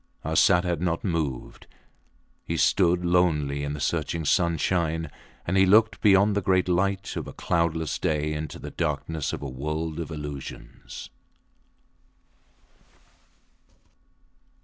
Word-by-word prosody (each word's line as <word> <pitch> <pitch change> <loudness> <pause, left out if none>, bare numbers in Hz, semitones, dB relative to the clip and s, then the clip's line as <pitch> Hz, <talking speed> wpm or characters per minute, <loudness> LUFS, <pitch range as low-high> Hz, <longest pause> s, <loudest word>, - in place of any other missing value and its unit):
Arsat 85 +3 +4
had 85 -3 -2
not 85 -2 -1
moved. 80 - -3 0.8
He - - -3
stood 90 -1 +3
lonely 80 -5 +2
in 70 0 -3
the 75 - -6
searching 80 +1 -1
sunshine; 80 -1 +1 0.3
and 85 - -1
he 95 0 +5
looked 110 +3 +4
beyond 100 0 +5
the 100 - +1
great 95 0 +2
light 95 +3 0
of - - -4
a - - -8
cloudless 85 -1 -1
day 75 0 0
into 75 -1 -5
the - - -8
darkness 75 -1 -2
of - - -5
a - - -3
world 75 +5 -4
of 85 - -4
illusions. 75 -3 -8
80 Hz, 125 wpm, -26 LUFS, 75-90 Hz, 0.8 s, he